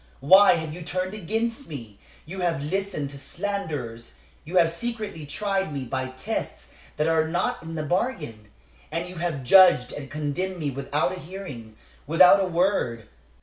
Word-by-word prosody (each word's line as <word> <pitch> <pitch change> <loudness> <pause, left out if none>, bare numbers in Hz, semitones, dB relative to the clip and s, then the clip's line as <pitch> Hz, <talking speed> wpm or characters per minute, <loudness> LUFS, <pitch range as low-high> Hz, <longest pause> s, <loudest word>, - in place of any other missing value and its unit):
Why 190 +9 +8
have 160 -2 -3
you 175 - -8
turned 185 +3 -3
against 225 +6 -2
me? 115 -9 -9 0.3
You 185 +5 -7
have 170 -6 0
listened 180 -3 -2
to 140 - -9
slanderers; 150 - -4 0.3
you 175 +4 -2
have 165 -2 +5
secretly 215 -6 -5
tried 195 +4 -1
me 140 -2 -4
by 130 +1 -3
tests 130 0 -5 0.3
that 150 +1 +1
are 160 -1 +2
not 185 +10 -1
in 165 0 -7
the 155 - -2
bargain, 150 - -2 0.4
and 170 +1 -2
you 180 0 -9
have 165 -5 -2
judged 175 -3 +6
and 135 -2 -7
condemned 155 +5 -3
me 150 -4 -2
without 140 +1 -1
a - - -9
hearing, 140 - -9 0.3
without 180 +5 +7
a 190 - +1
word. 170 - 0
165 Hz, 165 wpm, -25 LUFS, 140-190 Hz, 0.4 s, Why